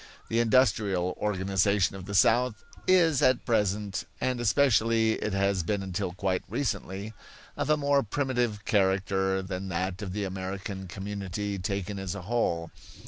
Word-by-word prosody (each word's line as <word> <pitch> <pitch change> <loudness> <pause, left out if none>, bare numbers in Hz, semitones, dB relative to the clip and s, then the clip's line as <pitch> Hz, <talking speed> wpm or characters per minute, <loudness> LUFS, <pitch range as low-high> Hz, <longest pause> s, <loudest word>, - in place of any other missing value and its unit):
The 115 - +1
industrial 110 -7 +2
organization 95 -1 +1
of 95 -2 -8
the 100 0 -4
South 120 +2 +3 0.2
is 170 -6 +4
at 130 -1 +3
present, 105 -2 0
and 125 -1 -1
especially 115 -1 +3
it 105 -2 -2
has 100 -1 +1
been 100 +4 -1
until 90 -2 -3
quite 95 0 -1
recently, 105 -3 -3 0.4
of - - -2
a 155 - +4
more 140 -1 +3
primitive 120 -4 -1
character 95 -1 +1
than 95 0 -5
that 90 +2 -2
of 100 -3 -4
the 105 +2 -2
American 95 0 -5
community 100 +1 -4
taken 100 +1 -3
as 95 -2 -4
a 100 - -7
whole. 85 -6 -1
100 Hz, 145 wpm, -28 LUFS, 95-115 Hz, 0.4 s, is